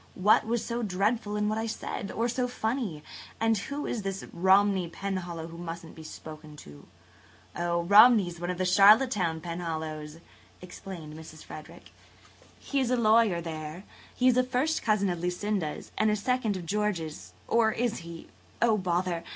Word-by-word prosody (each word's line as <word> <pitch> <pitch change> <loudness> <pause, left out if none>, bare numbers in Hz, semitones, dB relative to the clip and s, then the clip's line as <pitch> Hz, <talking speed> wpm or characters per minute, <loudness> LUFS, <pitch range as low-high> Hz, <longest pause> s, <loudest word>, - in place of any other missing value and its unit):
"What 210 +3 +4
was 235 0 -1
so 235 0 -2
dreadful 205 +1 0
in 210 0 0
what 215 +1 -1
I 225 - -2
said? 215 -2 -5
Or 230 +1 0
so 245 +1 -1
funny? 220 - -3 0.4
And 225 0 +3
who 280 +8 -4
is 230 - -2
this 195 0 -4
Romney 190 0 +3
Penhallow 175 -3 -4
who 165 +1 -10
musn't 170 -1 -7
be 160 - -11
spoken 155 -1 -10
to?" 75 - -13 0.7
"Oh, 170 0 0
Romney 210 +2 +7
is 175 -1 -8
one 175 +1 -4
of 180 - -2
the 185 - 0
Charlottetown 195 -3 +5
Penhallows," 160 -2 -5 0.4
explained 175 -3 -9
Mrs. 155 0 -11
Frederick. 155 - -11 0.7
"He 280 - -2
is 260 -3 0
a 250 - +2
lawyer 220 -5 +4
there. 160 +1 -6 0.3
He 255 - +2
is 250 -1 +4
a 255 - +5
first 260 +5 0
cousin 210 -3 +2
of 175 - -4
Lucinda's 180 -1 -3
and 215 0 +3
a 210 - +2
second 220 -1 0
of 175 - -7
George's–or 210 +3 -1
is 235 0 -1
he? 170 -1 -10 0.3
Oh, 225 -2 +3
bother! 175 -2 -1
195 Hz, 165 wpm, -28 LUFS, 170-220 Hz, 0.7 s, Romney